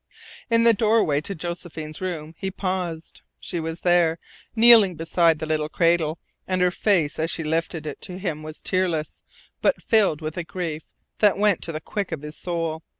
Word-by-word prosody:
In 230 0 +4
the 230 0 +6
doorway 210 -9 +2
to 195 +5 -5
Josephine's 165 -2 -6
room 165 -4 -4
he 195 - -2
paused. 185 -4 -4 0.2
She 175 - -4
was 165 +1 -5
there, 175 -2 +3 0.4
kneeling 225 -5 +7
beside 165 0 +2
the 155 - -4
little 155 -1 -1
cradle, 165 -1 +1 0.3
and 185 -1 0
her 180 0 +3
face 175 -7 +1
as 160 +1 0
she 165 - -2
lifted 160 0 -2
it 150 - -6
to 180 - -6
him 165 -6 -3
was 155 0 -9
tearless, 175 -5 -1 0.4
but - - +2
filled 205 -9 +2
with 155 0 -5
a 175 - -2
grief 165 -3 -5 0.3
that 205 -3 +4
went 205 -3 +2
to 165 - -4
the 155 - -4
quick 200 +1 -4
of 155 -3 -5
his 150 0 -7
soul. 165 -2 -2
170 Hz, 185 wpm, -24 LUFS, 155-185 Hz, 0.4 s, kneeling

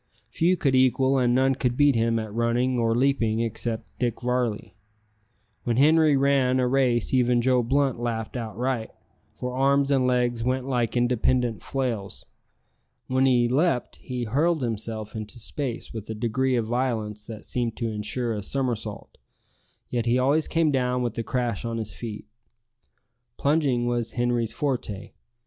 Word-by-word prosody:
Few 180 +3 +2
could 140 -4 +1
equal 130 +1 +3
and 120 -1 +2
none 135 +1 +3
could 125 -2 -1
beat 145 -1 +5
him 115 0 +1
at 110 -2 -4
running 120 +2 +1
or 115 -1 +2
leaping 115 -4 +1
except 115 0 -4
Dick 120 -3 -1
Varley. 125 -3 -1 0.9
When 120 -1 0
Henri 155 +1 +5
ran 135 -2 +3
a 125 - +2
race 125 -2 +1
even 125 -1 +3
Joe 125 +1 +3
Blunt 135 +1 +1
laughed 115 -1 -3
outright, 120 +1 -2 0.5
for 125 0 -4
arms 140 +1 +2
and 130 -2 +3
legs 120 -2 +1
went 130 +1 -1
like 125 -3 0
independent 120 -3 +1
flails. 120 -7 -3 0.8
When 130 +1 +2
he 120 -2 +4
leaped, 135 +1 0
he 125 -1 -5
hurled 145 +7 +1
himself 110 -2 -4
into 110 +2 -6
space 120 +1 -5
with 110 -2 -7
a 110 - -3
degree 125 +4 0
of 115 -2 0
violence 110 -3 -2
that 110 -2 -8
seemed 120 -2 -2
to 115 -2 -2
insure 110 +3 -2
a 105 - -3
somersault; 115 -2 -4 0.7
yet 120 -1 -2
he 120 +2 +3
always 140 +5 +2
came 165 -2 +2
down 125 -2 0
with 120 -2 -2
a - - -1
crash 120 -3 -2
on 115 -1 -3
his 110 -4 -4
feet. 110 0 -7 1.1
Plunging 140 -5 +1
was 120 -2 -1
Henri's 120 -2 0
forte. 120 -8 -3
125 Hz, 160 wpm, -25 LUFS, 115-130 Hz, 1.1 s, beat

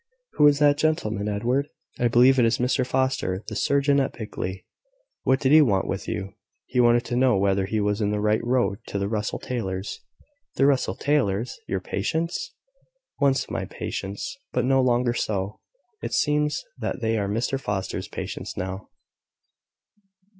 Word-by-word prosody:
"Who 150 - +5
is 145 -1 +5
that 145 0 +4
gentleman, 110 -10 0
Edward?" 120 +8 0 0.3
"I 120 - +3
believe 125 +3 +5
it 120 - +5
is 115 0 +2
Mr 125 +1 +1
Foster, 130 -8 0
the 105 - -6
surgeon 140 +6 +2
at 135 - 0
Blickley." 95 -4 -5 0.6
"What 130 +1 +2
did 135 - +2
he 155 +1 +8
want 100 -9 +2
with 95 - -4
you?" 95 0 -4 0.3
"He 125 - -1
wanted 120 0 +4
to 120 - -3
know 125 -3 +4
whether 95 0 +1
he 110 +2 -1
was 105 +1 0
in 105 - +1
the 105 0 -1
right 105 +1 +1
road 120 -4 +1
to - - -3
the 100 0 -1
Russell 105 0 -2
Taylors." 95 -6 -4 0.6
"The 135 - +3
Russell 140 -2 +2
Taylors! 125 -6 0
Your 95 -1 -2
patients!" 165 - -2 0.6
"Once 140 -2 +2
my - - -2
patients, 100 +1 -5 0.2
but 125 -1 0
no 135 +1 +4
longer 120 -1 +2
so. 100 -3 -2 0.4
It - - -4
seems 150 0 +1 0.2
they 115 -1 -1
are 100 -1 -1
Mr 120 +6 -1
Foster's 95 -5 -3
patients - - -6
now." 95 +2 -5
120 Hz, 165 wpm, -25 LUFS, 100-135 Hz, 0.6 s, he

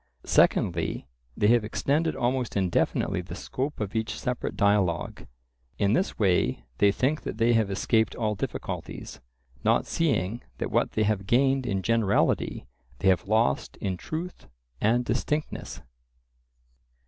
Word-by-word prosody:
Secondly, - - +2 0.3
they - - +1
have 120 -1 +4
extended 145 +9 0
almost 125 -3 -1
indefinitely 95 -3 +1
the - - -8
scope 140 +3 -4
of 105 0 -4
each 110 0 -2
separate 125 -1 -3
dialogue; 100 -5 +1 0.5
in 100 +1 +2
this 185 - 0
way 90 - +1 0.2
they 100 - +5
think 135 +9 0
that - - -5
they 115 +1 +3
have 110 -3 +2
escaped 110 +2 +1
all 110 -2 0
difficulties, 100 - -5 0.4
not - - +3
seeing 120 - 0 0.2
that - - -3
what - - +1
they 110 - +1
have 100 -2 0
gained 135 +2 +3
in 95 -3 -1
generality 115 - +1 0.3
they 95 - +2
have 95 0 +2
lost 110 -11 +1
in 95 -2 -2
truth 165 - -6 0.3
and 120 +3 +2
distinctness. 150 +6 -2
110 Hz, 135 wpm, -27 LUFS, 100-125 Hz, 0.5 s, they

